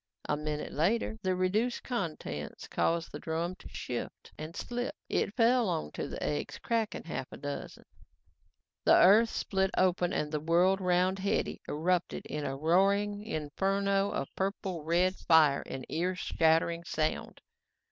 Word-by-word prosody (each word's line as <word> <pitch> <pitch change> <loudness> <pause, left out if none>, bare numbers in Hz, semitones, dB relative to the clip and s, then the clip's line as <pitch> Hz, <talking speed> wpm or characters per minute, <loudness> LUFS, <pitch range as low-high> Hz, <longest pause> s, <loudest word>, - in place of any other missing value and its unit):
A 150 - +1
minute 150 0 -4
later, 220 +7 0
the 185 -2 0
reduced 210 +7 0
contents 155 - -4
caused 165 0 0
the - - -6
drum 165 +2 -2
to - - -12
shift 120 - -6
and 155 +3 -8
slip. 245 +3 -3
It 205 - 0
fell 235 -2 +4
onto 75 - -3
the - - -6
eggs, 75 -1 -2
cracking 225 -2 -1
a - - -15
half 130 - -4
dozen. 145 -1 -7 1.0
The - - +6
earth 215 +5 +7
split 190 -3 0
open 180 -1 +2
and 150 -5 -1
the 150 - -1
world 175 +5 +3
around 180 +1 +2
Hetty 200 +1 -1
erupted 175 +4 0
in 150 -1 -4
a 135 0 -3
roaring 200 +6 +2
inferno 195 +2 0
of 135 - -4
purple 190 -3 -2
red 175 +4 +2
fire 155 -4 +4
and 130 -1 -6
ear 180 +3 -1
shattering 165 0 +2
sound. 155 -2 -2
180 Hz, 145 wpm, -31 LUFS, 155-195 Hz, 1.0 s, earth